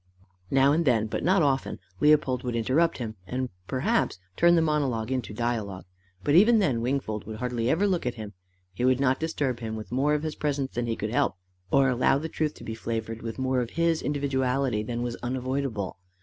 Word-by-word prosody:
Now 135 Hz, +1 st, +4 dB
and 160 Hz, +3 st, +2 dB
then 120 Hz, -7 st, +3 dB
but 110 Hz, -, -3 dB
not 185 Hz, -1 st, +4 dB
often 135 Hz, -2 st, 0 dB, 0.2 s
Leopold 150 Hz, -4 st, +3 dB
would 125 Hz, -2 st, -2 dB
interrupt 135 Hz, +9 st, +2 dB
him, 110 Hz, -4 st, -5 dB
and 130 Hz, +3 st, -2 dB, 0.2 s
perhaps 160 Hz, -, 0 dB, 0.2 s
turn 170 Hz, 0 st, +5 dB
the 165 Hz, -, +4 dB
monologue 135 Hz, -7 st, 0 dB
into 130 Hz, -4 st, -2 dB
dialogue, 110 Hz, -4 st, -3 dB, 0.4 s
but 145 Hz, -, +1 dB
even 215 Hz, +8 st, +7 dB
then 135 Hz, -, +1 dB
Wingfold 120 Hz, -5 st, -2 dB
would 110 Hz, -, -5 dB
hardly 120 Hz, 0 st, -1 dB
ever 170 Hz, +8 st, +2 dB
look 180 Hz, -9 st, 0 dB
at 125 Hz, -, -2 dB
him: 105 Hz, -2 st, -7 dB, 0.4 s
he 110 Hz, -, -4 dB
would 130 Hz, 0 st, +3 dB
not 130 Hz, -1 st, +2 dB
disturb 145 Hz, -6 st, -1 dB
him 110 Hz, -1 st, -4 dB
with 110 Hz, 0 st, -8 dB
more 140 Hz, +4 st, +2 dB
of 150 Hz, -, -2 dB
his 155 Hz, -1 st, -2 dB
presence 140 Hz, -3 st, -2 dB
than 120 Hz, 0 st, -2 dB
he 115 Hz, -, 0 dB
could 110 Hz, 0 st, -4 dB
help, 120 Hz, -, +1 dB, 0.3 s
or 135 Hz, +4 st, +4 dB
allow 130 Hz, +1 st, +3 dB
the 160 Hz, +3 st, -4 dB
truth 155 Hz, -1 st, -2 dB
to -, -, -12 dB
be 110 Hz, -, -5 dB
flavoured 115 Hz, 0 st, -4 dB
with 115 Hz, -1 st, -5 dB
more 130 Hz, -1 st, +1 dB
of 120 Hz, -, -3 dB
his 165 Hz, -1 st, +2 dB
individuality 135 Hz, -4 st, 0 dB
than 120 Hz, +2 st, -3 dB
was 120 Hz, -1 st, -3 dB
unavoidable. 125 Hz, -6 st, -3 dB
130 Hz, 205 wpm, -27 LUFS, 115-145 Hz, 0.4 s, even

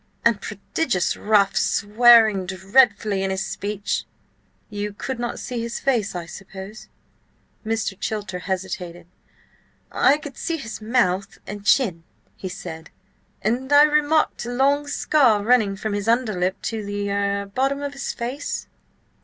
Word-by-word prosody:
"And 230 Hz, -4 st, +3 dB
prodigious 210 Hz, -, -1 dB
rough, 200 Hz, -2 st, +2 dB
swearing 215 Hz, -2 st, +5 dB
dreadfully 195 Hz, +2 st, +2 dB
in 195 Hz, -, -1 dB
his 190 Hz, 0 st, -2 dB
speech." 205 Hz, 0 st, -3 dB, 0.6 s
"You 205 Hz, -1 st, -4 dB
could 260 Hz, +4 st, -5 dB
not 240 Hz, 0 st, -3 dB
see 245 Hz, -2 st, -4 dB
his 235 Hz, 0 st, -4 dB
face, 230 Hz, -8 st, 0 dB
I 175 Hz, -1 st, -4 dB
suppose?" 195 Hz, +4 st, -10 dB, 0.8 s
Mr. 220 Hz, -2 st, -2 dB
Chilter 205 Hz, -4 st, -3 dB
hesitated. 180 Hz, -2 st, -4 dB, 0.9 s
"I 280 Hz, -, +4 dB
could 290 Hz, -3 st, -10 dB
see 330 Hz, -, -2 dB
his 225 Hz, -6 st, -7 dB
mouth 200 Hz, -5 st, 0 dB
and 205 Hz, -1 st, -7 dB
chin," 200 Hz, -8 st, +2 dB, 0.3 s
he 185 Hz, -, -6 dB
said, 170 Hz, -4 st, -8 dB, 0.5 s
"and 250 Hz, +5 st, -1 dB
I 290 Hz, 0 st, +8 dB
remarked 300 Hz, +1 st, +2 dB
a -, -, -3 dB
long 280 Hz, +4 st, +2 dB
scar 255 Hz, -8 st, +3 dB
running 220 Hz, -4 st, +3 dB
from 210 Hz, +1 st, -4 dB
his 205 Hz, +1 st, -3 dB
under 230 Hz, -1 st, +2 dB
lip 180 Hz, +1 st, -1 dB
to 225 Hz, -2 st, -3 dB
the–er–bottom 200 Hz, +6 st, -1 dB
of 285 Hz, 0 st, -4 dB
his 275 Hz, -, -4 dB
face." 255 Hz, +4 st, -4 dB
215 Hz, 135 wpm, -23 LUFS, 195-250 Hz, 0.9 s, I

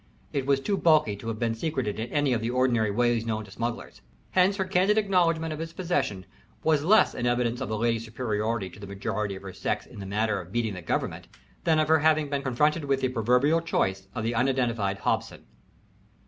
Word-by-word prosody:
It 140 Hz, -2 st, -1 dB
was 140 Hz, -1 st, +3 dB
too 200 Hz, +8 st, -1 dB
bulky 155 Hz, -, +3 dB
to 115 Hz, -, -9 dB
have 115 Hz, -1 st, -3 dB
been 115 Hz, 0 st, 0 dB
secreted 120 Hz, -4 st, -2 dB
in 115 Hz, +2 st, -3 dB
any 145 Hz, -3 st, +2 dB
of 115 Hz, -, 0 dB
the 115 Hz, -, -1 dB
ordinary 120 Hz, -3 st, +2 dB
ways 120 Hz, +2 st, +1 dB
known 110 Hz, -1 st, -3 dB
to 100 Hz, -, -15 dB
smugglers. 115 Hz, +3 st, -5 dB, 0.3 s
Hence 185 Hz, +2 st, +4 dB
her 190 Hz, -1 st, -1 dB
candid 190 Hz, +3 st, +2 dB
acknowledgment 170 Hz, -6 st, +2 dB
of 155 Hz, -, -6 dB
its 165 Hz, 0 st, -6 dB
possession 165 Hz, -, -1 dB, 0.4 s
was 155 Hz, -2 st, +3 dB
less 215 Hz, +7 st, +5 dB
an 120 Hz, -, -2 dB
evidence 120 Hz, 0 st, 0 dB
of 130 Hz, -, -3 dB
the 110 Hz, -, -1 dB
lady's 115 Hz, 0 st, 0 dB
superiority 110 Hz, -2 st, -2 dB
to -, -, -14 dB
the 100 Hz, -, -8 dB
majority 100 Hz, +1 st, -3 dB
of 95 Hz, -, -10 dB
her 95 Hz, -1 st, -7 dB
sex -, -, -2 dB
in -, -, -12 dB
the 95 Hz, -, -6 dB
matter 105 Hz, 0 st, 0 dB
of 90 Hz, 0 st, -13 dB
"beating 115 Hz, -1 st, -1 dB
the 90 Hz, -, -7 dB
government" 80 Hz, -, -3 dB, 0.4 s
than 160 Hz, -2 st, +4 dB
of 155 Hz, -1 st, +2 dB
her 160 Hz, 0 st, +5 dB
having 155 Hz, -1 st, +2 dB
been 140 Hz, -1 st, 0 dB
confronted 150 Hz, +4 st, +1 dB
with 135 Hz, -1 st, 0 dB
the 130 Hz, -, +1 dB
proverbial 125 Hz, +7 st, +2 dB
choice 95 Hz, -, -1 dB
of 110 Hz, -, -2 dB
the 115 Hz, +2 st, 0 dB
unidentified 120 Hz, -5 st, 0 dB
Hobson. -, -, -2 dB
120 Hz, 220 wpm, -27 LUFS, 110-155 Hz, 0.4 s, less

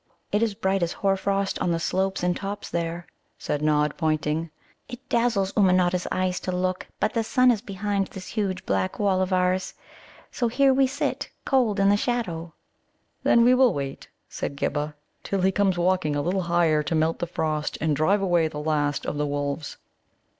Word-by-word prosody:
"It 210 Hz, -, +1 dB
is 225 Hz, -3 st, +1 dB
bright 190 Hz, 0 st, 0 dB
as 170 Hz, 0 st, 0 dB
hoarfrost 195 Hz, 0 st, 0 dB
on -, -, 0 dB
the 165 Hz, -1 st, 0 dB
slopes 190 Hz, +2 st, -1 dB
and 180 Hz, 0 st, +1 dB
tops 200 Hz, +2 st, -5 dB
there," 170 Hz, 0 st, -3 dB, 0.3 s
said 145 Hz, -, -3 dB
Nod, 150 Hz, -1 st, +2 dB
pointing. 155 Hz, 0 st, 0 dB, 0.4 s
"It 245 Hz, -1 st, -10 dB
dazzles 230 Hz, -5 st, +1 dB
Ummanodda's 180 Hz, -2 st, +3 dB
eyes 185 Hz, 0 st, 0 dB
to 185 Hz, -, -4 dB
look. 185 Hz, 0 st, -2 dB
But 215 Hz, -, 0 dB
the 230 Hz, -, +1 dB
sun 255 Hz, +3 st, +4 dB
is 220 Hz, -4 st, -1 dB
behind 200 Hz, 0 st, -2 dB
this 190 Hz, -1 st, -9 dB
huge 195 Hz, -4 st, -2 dB
black 95 Hz, -1 st, -1 dB
wall 195 Hz, -3 st, +2 dB
of 185 Hz, 0 st, -1 dB
ours, 185 Hz, 0 st, +1 dB, 0.6 s
so 240 Hz, -, 0 dB
here 270 Hz, +3 st, +3 dB
we 265 Hz, 0 st, +4 dB
sit 260 Hz, -, -2 dB, 0.2 s
cold 240 Hz, -7 st, +2 dB
in 195 Hz, 0 st, +4 dB
the 205 Hz, -, +4 dB
shadow." 180 Hz, -9 st, -2 dB, 0.7 s
"Then 235 Hz, -, +4 dB
we 245 Hz, +2 st, +6 dB
will 255 Hz, -1 st, +4 dB
wait," 140 Hz, -1 st, -5 dB, 0.2 s
said 140 Hz, -, -5 dB
Ghibba, 150 Hz, +1 st, -2 dB, 0.3 s
"till 195 Hz, -1 st, -2 dB
he 190 Hz, +1 st, +3 dB
come 200 Hz, 0 st, +2 dB
walking 175 Hz, -4 st, +1 dB
a 145 Hz, -, 0 dB
little 185 Hz, +4 st, 0 dB
higher 170 Hz, -3 st, +2 dB
to 155 Hz, +2 st, -2 dB
melt 160 Hz, +1 st, +1 dB
the 175 Hz, -, -2 dB
frost 155 Hz, -3 st, -2 dB
and 155 Hz, -1 st, +1 dB
drive 195 Hz, +8 st, +2 dB
away 175 Hz, -4 st, +3 dB
the 155 Hz, -, -7 dB
last 150 Hz, -1 st, -1 dB
of -, -, -3 dB
the 150 Hz, 0 st, 0 dB
wolves." 145 Hz, +1 st, -3 dB
185 Hz, 190 wpm, -25 LUFS, 155-200 Hz, 0.7 s, we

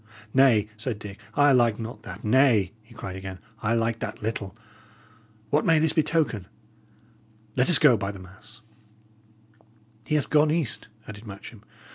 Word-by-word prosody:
"Nay," 125 Hz, -6 st, +4 dB
said 115 Hz, 0 st, -4 dB
Dick, 105 Hz, -1 st, -10 dB, 0.2 s
"I 145 Hz, 0 st, +5 dB
like 120 Hz, -4 st, +3 dB
not 115 Hz, -1 st, -7 dB
that. -, -, -10 dB
Nay," 110 Hz, -5 st, +3 dB
he 115 Hz, +1 st, -19 dB
cried 95 Hz, -5 st, -7 dB
again, 95 Hz, 0 st, -7 dB, 0.2 s
"I 115 Hz, +2 st, +1 dB
like 115 Hz, 0 st, 0 dB
that 105 Hz, -1 st, -5 dB
little. 105 Hz, -2 st, -4 dB, 0.9 s
What 150 Hz, -, +3 dB
may 165 Hz, -1 st, +4 dB
this 155 Hz, 0 st, +3 dB
betoken? 150 Hz, -, 0 dB, 1.1 s
Let 125 Hz, +4 st, +3 dB
us 175 Hz, -, +8 dB
go, 145 Hz, -7 st, +5 dB
by 100 Hz, 0 st, -3 dB
the 100 Hz, -, -10 dB
mass!" 95 Hz, +5 st, -15 dB, 1.4 s
"He 150 Hz, -, -1 dB
hath 150 Hz, -, -1 dB
gone 150 Hz, 0 st, +4 dB
east," 155 Hz, -9 st, -2 dB, 0.2 s
added 110 Hz, +1 st, -10 dB
Matcham. 100 Hz, +2 st, -10 dB
115 Hz, 155 wpm, -25 LUFS, 105-135 Hz, 1.4 s, us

